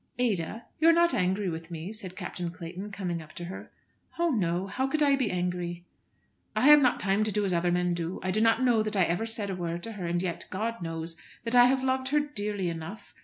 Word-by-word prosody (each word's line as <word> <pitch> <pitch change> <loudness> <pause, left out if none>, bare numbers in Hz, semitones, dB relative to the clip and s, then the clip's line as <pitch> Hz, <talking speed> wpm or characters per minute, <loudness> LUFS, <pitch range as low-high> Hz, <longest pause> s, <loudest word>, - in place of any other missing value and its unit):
"Ada, 225 -2 -1
you 325 +2 +6
are - - +7
not 340 -1 +4
angry 190 -2 +1
with 165 -1 -5
me," 170 +4 -6
said 190 -4 -7
Captain 180 -2 -4
Clayton, 180 +3 -7
coming 180 -4 -3
up 155 -1 -13
to 175 - -6
her. 185 +2 -8 0.5
"Oh, 340 0 +2
no! 180 - 0
How 260 +7 -1
could 305 +2 +1
I 280 -1 +5
be 260 -6 0
angry?" 175 -1 -2 0.7
"I - - +1
have 295 +2 +8
not 250 -2 +3
time 200 +2 +2
to 215 - -1
do 210 0 0
as 190 - 0
other 175 +1 +2
men 180 0 +1
do. 170 +1 -3
I 185 - 0
do 215 - +1
not 225 +3 +4
know 240 -3 +4
that 215 0 -2
I 190 - +5
ever 175 +7 0
said 215 -3 -2
a - - -3
word 170 -1 -4
to 230 - -5
her; 195 -5 -5
and 175 +1 0
yet, 175 -2 -3
God 225 +3 -3
knows, 165 0 -4 0.3
that 230 0 -2
I 245 0 +8
have 260 +1 +2
loved 260 0 0
her 295 +2 +3
dearly 210 -10 -2
enough. 170 +5 -6
195 Hz, 245 wpm, -28 LUFS, 175-230 Hz, 0.7 s, have